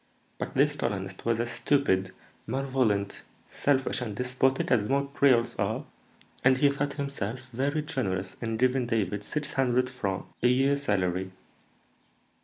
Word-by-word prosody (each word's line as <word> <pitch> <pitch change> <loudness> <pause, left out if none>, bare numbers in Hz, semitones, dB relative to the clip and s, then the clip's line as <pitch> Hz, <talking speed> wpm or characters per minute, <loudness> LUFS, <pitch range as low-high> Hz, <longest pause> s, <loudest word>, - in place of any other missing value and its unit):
But - - -4
this 145 +2 +3
colonist 95 -8 -3
was 115 -1 +2
as 120 +1 -1
stupid, 95 -10 +1 0.4
malevolent, 125 -6 0 0.3
selfish, 135 -2 0
and 110 -4 -4
despotic 130 +2 +1
as 110 -3 +3
most 140 +1 0
creoles 125 -4 +3
are, - - -1 0.6
and 130 0 +5
he 140 +1 +4
thought 140 0 -2
himself 130 -3 -4
very 140 +5 0
generous 95 - -2
in 115 -1 -2
giving 130 +1 +2
David 105 -3 -1
six 150 +6 -3
hundred 125 -1 +2
francs 100 -7 -3
(24_l._) - - -27
a 120 - +4
year 135 +3 +3
salary. 95 -7 0
125 Hz, 145 wpm, -28 LUFS, 105-140 Hz, 0.6 s, and